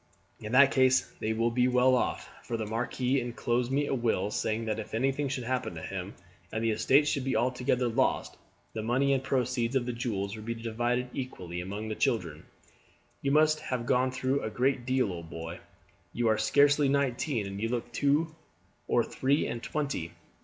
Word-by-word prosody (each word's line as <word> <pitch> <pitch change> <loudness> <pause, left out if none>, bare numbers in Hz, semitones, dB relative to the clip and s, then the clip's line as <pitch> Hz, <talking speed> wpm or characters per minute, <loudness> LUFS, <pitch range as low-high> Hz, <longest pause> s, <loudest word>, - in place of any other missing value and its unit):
"In 105 +2 -6
that 140 +1 +7
case 130 -1 +4 0.2
they 110 - -1
will 115 +1 +1
be 125 +1 +3
well 125 +1 +4
off, 125 - 0
for 115 - -4
the 110 - -3
marquis 125 +4 0
inclosed 120 +1 -1
me 145 +2 +2
a - - -2
will, 110 -5 0
saying 110 +1 -1
that 110 0 -2
if 110 - -6
anything 135 +4 0
should 130 -2 -3
happen 125 -6 -2
to 80 - -6
him, 95 0 -5 0.4
and 110 +1 -2
the 115 - +2
estates 130 +7 +3
should 140 -3 0
be 135 -2 -1
altogether 125 +1 +1
lost, 125 +3 0 0.4
the 110 - -3
money 130 +5 +2
and 135 -1 0
proceeds 125 -2 0
of 130 -2 +2
the 125 - -2
jewels 110 -5 -3
were 110 - -8
to - - -11
be 115 - -2
divided 120 +2 -1
equally 90 -10 -5
among 100 +4 -5
his 110 - -5
children. - - -1 0.7
You 140 - 0
must 155 +1 +4
have 125 -2 -3
gone 125 +2 +2
through 130 +2 -1
a - - -3
great 125 +2 0
deal, 130 -7 +1
old 85 -1 -8
boy. 80 +1 -7 0.5
You 120 -1 +1
are 110 - +3
scarcely 140 +5 +4
nineteen, 135 -3 0
and 100 +1 -6
you 115 - 0
look 120 0 -3
two 145 +6 +1 0.5
or 120 - +3
three 140 +5 +1
and 120 - -4
twenty." 140 - -3
125 Hz, 195 wpm, -29 LUFS, 110-135 Hz, 0.7 s, that